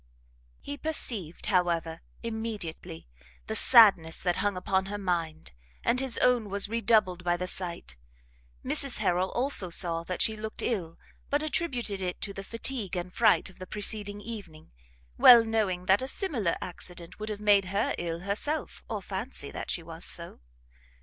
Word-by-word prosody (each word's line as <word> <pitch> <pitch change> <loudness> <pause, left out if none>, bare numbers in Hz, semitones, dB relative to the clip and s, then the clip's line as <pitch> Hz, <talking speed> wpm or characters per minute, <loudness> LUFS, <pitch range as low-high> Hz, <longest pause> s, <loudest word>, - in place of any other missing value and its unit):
He 285 0 -6
perceived, 230 - 0
however, 170 -3 0 0.2
immediately, 220 - -5 0.4
the - - -4
sadness 200 -10 +6
that 175 -1 -1
hung 205 -2 0
upon 190 +1 0
her 205 +1 -4
mind, 170 - -3 0.3
and 250 - +2
his 265 -3 0
own 245 -4 +3
was 200 +1 0
redoubled 215 -5 +2
by 175 0 +1
the 180 - -3
sight: 170 - -5 0.7
Mrs - - +3
Harrel, 180 +2 +1
also, 245 -7 +2
saw 170 -1 0
that 185 - -4
she 220 - 0
looked 215 0 -6
ill, 175 -9 -2 0.3
but 290 +2 +1
attributed 250 - -1
it 180 -1 -3
to 200 - -3
the 195 - -7
fatigue 230 -2 -3
and 180 0 -4
fright 230 - +4
of 190 - -13
the 185 - -8
preceding 205 0 -1
evening, 200 -9 -9 0.5
well 235 -2 +9
knowing 205 -5 0
that 190 +4 +4
a 260 - -3
similar 260 - -1
accident 175 0 -7
would 215 +1 -5
have 210 -1 -4
made 205 -2 +4
her 195 +2 0
ill 170 -1 -3
herself, 210 - -3
or - - -4
fancy - - -4
that - - -6
she 170 - -2
was 165 +1 -10
so. 170 0 -3
195 Hz, 165 wpm, -28 LUFS, 175-225 Hz, 0.7 s, well